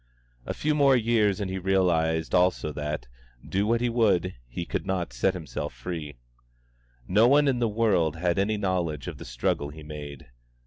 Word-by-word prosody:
A - - -2
few 150 0 0
more 140 -2 +5
years 110 -4 +2
and 100 - -2
he 95 - -3
realised 85 -4 +1
also 90 -4 +2
that, 75 +1 -4 0.4
do 100 +2 0
what 115 +1 +2
he 120 - +1
would, 105 -6 +2
he 70 +8 -5
could - - -3
not 90 -8 -2
set 95 +11 +1
himself 80 -7 -5
free. 75 +2 -6 0.9
No 105 +5 +5
one 145 +2 +5
in 130 -3 +2
the 120 - +2
world 100 -8 +2
had 85 +2 0
any 105 +2 +1
knowledge 90 -8 -1
of - - -6
the - - -8
struggle - - -1
he 75 +1 -11
made. 75 -4 -9
90 Hz, 180 wpm, -26 LUFS, 80-110 Hz, 0.9 s, more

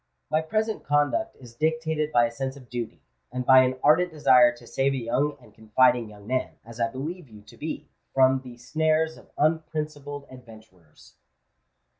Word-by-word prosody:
My 155 +1 +3
present 215 +6 -2
conduct 145 - +1
is 120 -3 -13
dictated 160 +2 -1
by 120 -5 +4
a 115 - -3
sense 130 +3 -4
of 130 -3 -15
duty, 115 - -5 0.3
and 125 0 -3
by 130 0 +8
an 130 0 +1
ardent 180 +4 +5
desire 125 -5 +5
to - - -15
save 135 +1 0
a - - -2
young 135 +5 -1
and 125 - -19
confiding 120 +1 +2
young 105 -1 -14
man, 130 +3 -2
as 115 +1 -11
I 115 - +2
believe 145 +6 -6
you 105 -2 -14
to 105 - -16
be, 155 +1 -6 0.2
from 130 0 +4
the 125 -2 -11
snares 160 +5 0
of - - -17
unprincipled 150 -2 -2
adventurers." 110 -10 -16
130 Hz, 175 wpm, -26 LUFS, 120-155 Hz, 0.3 s, by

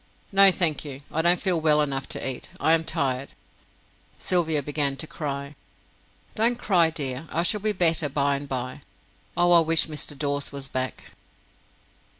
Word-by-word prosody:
"No, 195 0 +8
thank 170 -5 +1
you 140 -2 -8
I 160 - 0
don't 175 +2 +3
feel 180 -4 0
well 150 -1 +4
enough 140 -2 -2
to - - -3
eat. 130 -2 -5
I 160 - +3
am 165 0 +2
tired." 135 -3 -2 0.8
Sylvia 160 -5 +1
began 145 -1 -1
to 145 - -2
cry. 140 -2 -6 0.8
"Don't 235 +2 +1
cry, 180 -8 +3
dear. 145 -1 -3
I 170 - 0
shall 210 +4 +1
be 215 +1 0
better 165 -5 +2
by 140 0 0
and 140 0 -6
by. 130 -1 -5 0.6
Oh, 175 0 +3
I 170 - +8
wish 165 0 +3
Mr. 150 -2 -5
Dawes 145 0 -2
was 140 -1 -6
back." 130 0 -4
150 Hz, 165 wpm, -25 LUFS, 140-170 Hz, 0.8 s, No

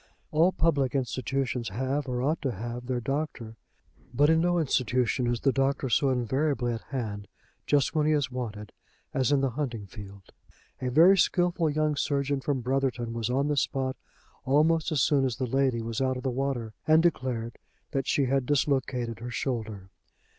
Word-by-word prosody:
All 165 +4 +4
public 145 -7 +1
institutions 130 -2 -2
have, 130 +7 -2
or 125 -1 -2
ought 155 +4 0
to 135 -5 -1
have, 120 +4 -6
their 125 -1 -1
doctor, 135 -4 -4 0.6
but 145 +3 +4
in 160 0 +4
no 175 +1 +2
institution 125 -4 +1
is 120 -1 -1
the 135 - +3
doctor 135 0 0
so 135 +3 +3
invariably 130 0 0
at 115 - -5
hand, 105 -7 -4 0.4
just 145 -2 +2
when 155 -2 +2
he - - +3
is 140 -4 0
wanted, 110 -4 -5 0.4
as 135 -1 +1
in 140 -2 +3
the 135 -2 +1
hunting 120 -6 -4
field. 100 -1 -12 0.5
A 130 - -1
very 175 +9 +6
skilful 175 -2 +2
young 150 0 0
surgeon 140 -1 0
from 135 -2 -1
Brotherton 125 -2 -1
was 115 0 -2
on 135 +3 +1
the 150 - +1
spot 130 0 0 0.5
almost 155 +5 +2
as 150 -4 +2
soon 140 -2 +3
as 130 -3 0
the 130 - -2
lady 130 -2 +1
was 115 +2 -3
out 130 -1 +1
of 125 - -7
the 130 - 0
water, 125 -4 -2
and 155 +1 +5
declared 125 -8 -1 0.3
that 135 -1 -2
she 140 - +2
had 130 -1 0
dislocated 130 -5 0
her 120 +2 -6
shoulder. 110 -7 -4
130 Hz, 180 wpm, -28 LUFS, 120-145 Hz, 0.6 s, very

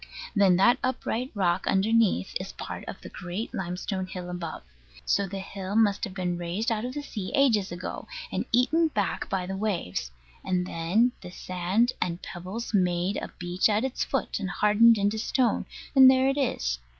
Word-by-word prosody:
Then 195 -3 +5
that 240 +8 +4
upright 255 -1 -1
rock 185 -2 +1
underneath 205 - +2
is - - -6
part - - -7
of - - -7
the - - -9
great 185 +6 -5
limestone 185 +1 -3
hill 180 -1 -6
above. 170 - -5 0.4
So 200 -1 +1
the 195 +1 -6
hill 195 0 -5
must 210 -3 +3
have 195 -3 -9
been 180 -2 -2
raised 185 +7 -2
out 220 +1 -1
of 255 +2 -5
the 290 - -4
sea, 205 -9 -5
ages 225 -10 +3
ago, 175 +1 -6 0.2
and - - -2
eaten 310 +8 +3
back 210 -10 -2
by 185 -2 -1
the 190 +1 -4
waves; 175 - -2 0.3
and 180 -1 0
then 185 +9 +2
the 180 - -8
sand 185 +6 0
and 170 -1 -1
pebbles 185 +9 -6
made 180 0 +1
a - - -4
beach 180 +3 +1
at 210 +2 +2
its 265 - -2
foot, 270 - -2
and 195 -2 -3
hardened 215 +4 +5
into 205 +2 0
stone; 245 +2 +1 0.3
and 265 -1 +10
there 260 0 +4
it 275 - -1
is. 60 - -1
195 Hz, 185 wpm, -27 LUFS, 180-230 Hz, 0.4 s, and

